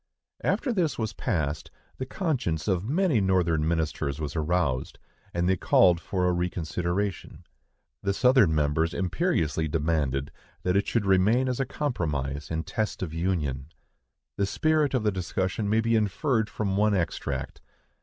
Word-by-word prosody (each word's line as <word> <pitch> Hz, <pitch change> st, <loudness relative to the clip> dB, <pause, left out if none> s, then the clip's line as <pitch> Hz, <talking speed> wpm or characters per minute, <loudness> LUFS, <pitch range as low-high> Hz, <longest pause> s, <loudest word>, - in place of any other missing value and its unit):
After 260 Hz, -4 st, +1 dB
this 175 Hz, -7 st, 0 dB
was 110 Hz, -3 st, -2 dB
passed, 75 Hz, -5 st, -2 dB, 0.3 s
the 130 Hz, -, -3 dB
conscience 125 Hz, -, -1 dB
of 95 Hz, +2 st, 0 dB
many 160 Hz, -, +2 dB
Northern 85 Hz, -5 st, +2 dB
ministers 80 Hz, -3 st, -1 dB
was 75 Hz, 0 st, -4 dB
aroused, 80 Hz, -5 st, 0 dB, 0.3 s
and 85 Hz, 0 st, 0 dB
they 95 Hz, -, +3 dB
called 85 Hz, -1 st, +4 dB
for 90 Hz, -2 st, -1 dB
a 90 Hz, -, +3 dB
reconsideration. 90 Hz, +2 st, -2 dB, 0.6 s
The 100 Hz, -, 0 dB
Southern 125 Hz, -, +4 dB
members 75 Hz, +2 st, +1 dB
imperiously 90 Hz, -, 0 dB
demanded 75 Hz, -3 st, 0 dB, 0.3 s
that 90 Hz, 0 st, +1 dB
it 100 Hz, -, +2 dB
should 115 Hz, -4 st, 0 dB
remain 100 Hz, +7 st, +3 dB
as 125 Hz, 0 st, -1 dB
a 135 Hz, -, +1 dB
compromise 75 Hz, -, -2 dB
and 80 Hz, 0 st, -2 dB
test 110 Hz, -4 st, -2 dB
of 80 Hz, -4 st, -5 dB
union. 80 Hz, -6 st, -1 dB, 0.7 s
The 100 Hz, -, +1 dB
spirit 155 Hz, +3 st, +1 dB
of 125 Hz, -, 0 dB
the 105 Hz, -, +2 dB
discussion 95 Hz, +2 st, -2 dB
may 110 Hz, +1 st, +3 dB
be 115 Hz, 0 st, +1 dB
inferred 110 Hz, +2 st, +1 dB
from 100 Hz, -3 st, -2 dB
one 105 Hz, 0 st, +3 dB
extract. 75 Hz, -6 st, -3 dB
95 Hz, 150 wpm, -27 LUFS, 80-110 Hz, 0.7 s, called